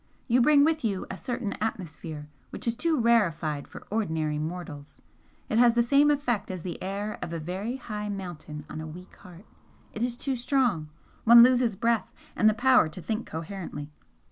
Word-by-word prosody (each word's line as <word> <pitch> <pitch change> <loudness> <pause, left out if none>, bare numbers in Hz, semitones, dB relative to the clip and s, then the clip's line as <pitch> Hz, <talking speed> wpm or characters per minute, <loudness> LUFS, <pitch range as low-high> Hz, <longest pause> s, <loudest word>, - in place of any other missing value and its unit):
"You 245 0 +4
bring 285 +3 +6
with 315 0 +1
you 200 -4 -1
a 190 - -6
certain 245 -4 -3
atmosphere 165 -7 -5 0.2
which - - -6
is 230 - +2
too 315 +5 0
rarefied 170 -11 +1
for - - -11
ordinary 160 -8 -1
mortals 155 -3 -6 0.5
it 220 - +1
has 240 -1 +5
the 235 - +4
same 280 +4 +4
effect 250 -8 0
as 185 -3 -5
the 175 -3 -6
air 200 +3 -4
of 175 -1 -5
a 165 - -3
very 190 +9 -4
high 210 -4 -5
mountain 175 -6 -7
on 155 - -6
a 160 - -6
weak 180 +4 -11
heart 180 +3 -14 0.5
it 220 - -6
is 240 0 -1
too 270 0 -2
strong 240 - 0 0.3
one 235 +1 +9
loses 245 -3 +4
breath, 230 +1 0 0.2
and 215 - +5
the 215 - 0
power 255 -7 +4
to 155 - -9
think 220 +5 -3
coherently. 160 -3 -6
210 Hz, 185 wpm, -27 LUFS, 165-240 Hz, 0.5 s, one